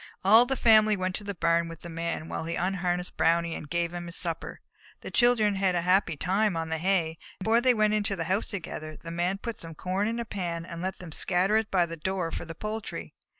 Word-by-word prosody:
All 225 +5 +7
the 270 - 0
family 215 -3 +5
went 185 0 -1
to 210 - -4
the 200 -1 -5
barn 170 0 +2
with 165 -1 -10
the - - -8
Man 165 -1 -4
while - - -4
he 170 - -2
unharnessed 180 -1 -1
Brownie 170 0 +2
and 150 - -7
gave 170 +1 -1
him 175 0 -5
his 170 - -6
supper. 170 -4 -2 0.4
The - - -7
children 225 -5 +3
had 190 -2 +2
a 175 - +1
happy 180 -3 +2
time 195 +3 +1
on 165 0 -3
the 160 0 -2
hay, 170 -3 0 0.2
and, - - -8
before 225 +2 +4
they 250 -1 +4
went 215 -1 +3
into 205 -2 0
the 170 - -2
house 190 +6 0
together, 155 -5 -6
the 165 - -9
Man 175 +3 0
put 230 +2 -6
some 165 -1 -8
corn 185 +5 -1
in 230 +1 -2
a 235 - -3
pan 170 -5 -4
and 170 0 -7
let 190 +1 -3
them 180 -3 -9
scatter 185 +6 +1
it 220 -1 +1
by 180 -2 +3
the 165 0 -7
door 180 0 -2
for - - -4
the 165 0 -8
poultry. 215 +3 -5
180 Hz, 245 wpm, -28 LUFS, 170-205 Hz, 0.4 s, All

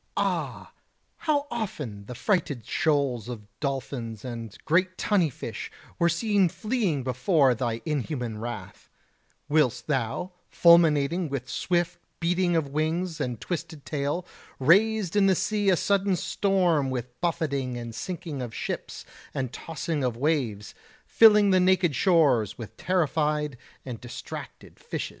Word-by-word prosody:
Ah! - - -2 0.6
how 290 -2 +3
often 145 - -5
the 125 - -7
frighted 145 - 0
shoals 140 -8 0
of 110 -4 -7
dolphins 125 -5 -4
and 115 -3 -6
great 185 +3 +2
tunny 190 -7 +2
fish 130 - -6 0.3
were 170 - +4
seen 200 +1 +2
fleeing 190 - -1
before 130 +2 +3
thy 120 -1 -2
inhuman 130 -7 -2
wrath; 120 +1 -7 0.6
whilst 150 -5 +2
thou, 135 +6 -1 0.2
fulminating 170 -1 +4
with 135 -2 -4
swift 175 -1 -1 0.2
beating 175 +1 +1
of 155 -4 0
wings 160 +4 -1
and 120 -3 -2
twisted 160 -4 -5
tail, 150 +4 -2 0.3
raised 200 +6 +3
in 200 -1 +5
the 190 - +4
sea 205 +2 +1
a 185 - +4
sudden 200 0 +2
storm 175 -7 +1
with 125 -1 -5
buffeting 140 -7 -1
and 120 -1 -6
sinking 160 0 -5
of 120 -3 -6
ships - - -5 0.3
and 130 -1 -2
tossing 160 -1 -3
of 120 -3 -1
waves, 125 -8 -1 0.3
filling 210 -3 +6
the 185 - +5
naked 180 -4 +3
shores 140 - +3
with 115 -3 -8
terrified 150 -5 0 0.3
and 125 -4 -6
distracted 120 - -9
fishes. - - -4
155 Hz, 135 wpm, -27 LUFS, 125-180 Hz, 0.6 s, filling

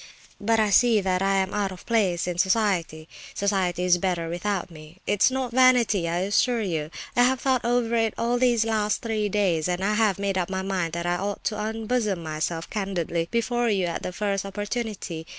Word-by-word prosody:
But 225 +2 +1
I 215 -2 +2
see 235 +1 +5
that 185 -1 0
I 195 0 +2
am 190 0 0
out 200 -2 -1
of 185 - -11
place 195 -7 +1
in 175 -1 -3
society—society 185 -1 -1
is 180 -1 +3
better 170 -3 -1
without 180 +1 -2
me. 155 +1 -13
It's 205 +3 +3
not 260 -2 -3
vanity, 235 -8 +4
I 170 +1 -1
assure 225 +4 +1
you. 160 -6 -2 0.3
I 245 - +4
have 255 +1 +3
thought 260 -3 +1
over 235 -1 +1
it 225 -2 +1
all 240 +1 0
these 240 -3 +3
last 215 -2 0
three 215 -2 -1
days, 185 -6 +1
and 180 +1 -2
I 210 +2 +1
have 210 -3 +2
made 195 -1 -1
up 180 - -2
my 190 0 -2
mind 185 -4 -2
that 170 0 -3
I 175 0 +1
ought 200 +2 -4
to 215 - -1
unbosom 220 -3 -1
myself 160 +1 -3
candidly 175 -5 -2
before 240 +1 0
you 195 -4 +1
at 170 - -3
the - - -4
first 200 +1 -2
opportunity. 205 -4 -5
200 Hz, 200 wpm, -25 LUFS, 175-225 Hz, 0.3 s, see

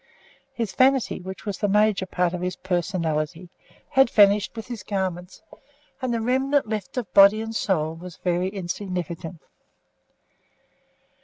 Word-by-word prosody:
His 230 -6 -3
vanity, 265 -4 +2
which 190 +3 -8
was 200 -3 -4
the 205 - +1
major 205 -1 +2
part 180 -1 0
of 180 - -4
his 180 0 -2
personality, 175 -2 -2 0.4
had 270 -3 +4
vanished 205 0 +4
with 225 -2 -6
his 240 -4 -7
garments, 185 -2 -4 0.6
and 255 -1 -1
the 230 - 0
remnant 265 +3 +1
left 215 +1 -5
of 220 -8 -4
body 200 +2 +7
and 225 0 -5
soul 160 -7 0
was 175 +1 -10
very 180 +1 0
insignificant. 180 -3 -5
190 Hz, 140 wpm, -24 LUFS, 180-220 Hz, 0.6 s, body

